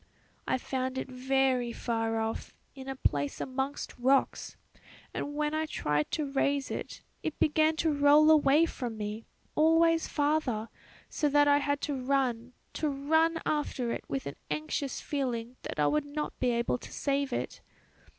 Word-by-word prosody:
"I - - +2
found 260 0 -3
it 265 - -4
very 255 -1 +1
far 225 -1 -1
off, 220 0 -4 0.2
in 265 -1 -10
a 270 - -3
place 145 - -1
amongst 265 +2 -3
rocks; 265 +2 +1 0.6
and 290 - -4
when 300 0 0
I 315 0 0
tried 150 - -1
to 305 - 0
raise 280 0 0
it, - - -6 0.2
it 315 - -3
began 310 +1 +3
to 315 0 +1
roll 290 +2 +6
away 300 +1 +5
from 245 -8 -5
me, 210 +1 -5 0.3
always 325 +1 +4
farther, 285 -7 0 0.4
so 295 - 0
that 290 0 +4
I 285 0 +5
had 285 0 -1
to 290 - -2
run, 255 -2 0 0.3
to 305 - +2
run 320 +4 +2
after 275 -5 -1
it - - -3
with 135 0 -3
an 140 - -6
anxious 155 - -2
feeling 250 -4 -3
that - - -6
I 150 - +4
would 300 - +1
not 300 +1 -5
be 250 - +2
able 235 +1 0
to - - -11
save 280 -1 -1
it. - - -3
275 Hz, 165 wpm, -30 LUFS, 240-295 Hz, 0.6 s, roll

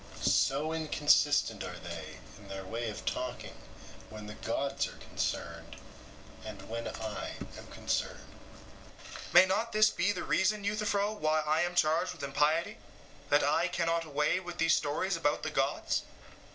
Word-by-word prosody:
So 150 +4 +2
inconsistent 145 -8 +3
are 90 -1 -6
they 85 -3 -7 0.2
in 100 - -14
their 95 0 -6
way 115 +4 -3
of 105 - -7
talking 125 -1 -3 0.6
when 110 -1 -9
the 105 - -7
gods 135 +6 -1
are - - -11
concerned, - - -4 0.7
and 100 -3 -8
when 115 +1 -4
I 110 -3 -5 0.2
am - - -10
concerned. - - -2 0.7
SOCRATES: - - -11
May 180 +2 +10
not 205 +5 0
this 215 0 +5
be 205 - +1
the 195 - -3
reason, 205 +2 +1
Euthyphro, 205 0 0
why 155 -6 +1
I 155 +1 +2
am 175 0 -1
charged 165 +3 +2
with 165 -5 -10
impiety 155 +9 +1 0.5
that - - +4
I - - +3
cannot 165 -1 0
away 150 +3 +1
with 175 -2 -8
these 165 -1 +4
stories 170 +6 0
about 165 -3 0
the - - -2
gods? - - 0
155 Hz, 155 wpm, -31 LUFS, 115-180 Hz, 0.7 s, May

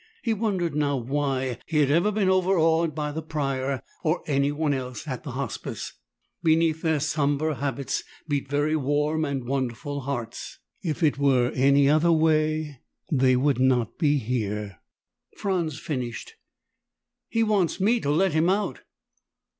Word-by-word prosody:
He 230 -3 +1
wondered 195 -7 -1
now 145 -2 +1
why 130 -1 -1
he 160 - -1
had 145 -2 +4
ever 175 +7 +3
been 205 -2 +1
overawed 170 -4 +3
by 150 -1 -2
the 160 +2 -4
Prior 135 -5 -2 0.2
or 160 +2 0
anyone 145 +1 +1
else 130 +2 -5
at 130 -3 -4
the 140 -6 -7
Hospice. 135 +1 -5 0.5
Beneath 160 0 +2
their 160 -2 +1
somber 155 0 0
habits 140 0 -2 0.2
beat 145 -2 -1
very 145 +2 +1
warm 150 +2 0
and 140 -4 -2
wonderful 135 +2 -2
hearts. 125 -4 -5 0.2
If 165 -2 -3
it 145 -3 +2
were 130 -3 +3
any 140 +1 +4
other 155 +4 +4
way, 155 -3 +1 0.3
they 130 -3 +4
would 135 0 +2
not 125 -3 +1
be 150 -3 +3
here. 105 - -3 0.6
Franz 175 -7 -1
finished, 125 -8 -5 1.0
"He 230 - +1
wants 205 -6 +1
me 225 +5 +3
to 145 - -2
let 170 +4 +2
him 160 +3 +3
out." 205 +2 0
145 Hz, 145 wpm, -25 LUFS, 135-160 Hz, 1.0 s, had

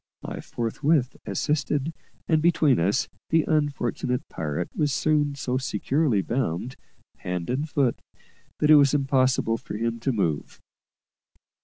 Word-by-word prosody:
I - - -5
forthwith 130 +4 0
assisted, 145 +1 -1 0.3
and, 160 -2 +3
between 155 - +3
us, 100 +9 +1 0.2
the 160 -1 +3
unfortunate 140 -3 -1
pirate 80 +2 -4
was 150 -2 +1
soon 145 0 +1
so 130 -2 -1
securely 130 -1 0
bound, 120 0 -2 0.4
hand 90 +2 -3
and 145 +5 -2
foot, 135 -5 +1 0.6
that 150 - +3
it 155 - +10
was 140 0 +5
impossible 130 -4 +2
for - - -6
him 115 +1 -2
to 135 +4 0
move. 85 - -2
130 Hz, 130 wpm, -25 LUFS, 115-150 Hz, 0.6 s, it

